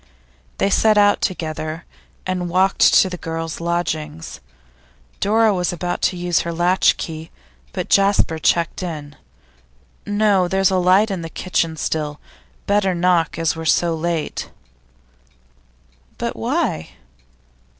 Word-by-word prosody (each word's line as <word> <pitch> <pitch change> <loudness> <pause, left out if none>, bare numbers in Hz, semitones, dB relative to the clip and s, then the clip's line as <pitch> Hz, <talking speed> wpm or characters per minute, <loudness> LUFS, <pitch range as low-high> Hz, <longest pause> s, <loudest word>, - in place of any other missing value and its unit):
They 200 - +1
set 215 +2 +4
out 205 0 +4
together, 160 -2 -3 0.4
and 180 -1 -2
walked 190 +2 +2
to - - +6
the 180 -1 -6
girls' 165 0 -5
lodgings. 160 - -3 0.8
Dora 220 +1 +3
was 180 -2 0
about 175 0 -3
to 180 - -8
use 175 -1 +1
her 170 - -3
latch 175 +2 +2
key, 160 0 -6 0.4
but - - -4
Jasper 195 -5 +2
checked 170 +3 +1
her. 155 -5 -5 1.0
'No. 205 -3 +2
There's 190 +1 +2
a 190 - +2
light 190 +4 +4
in 190 -3 -3
the 165 - -6
kitchen 165 -2 -2
still; 150 -2 -3 0.5
better 200 -2 +1
knock, 170 -2 +1
as 165 -1 0
we're 160 - -6
so 170 +1 +2
late.' 165 0 -3 1.7
'But - - -3
why? 80 - -2
175 Hz, 130 wpm, -20 LUFS, 165-190 Hz, 1.7 s, to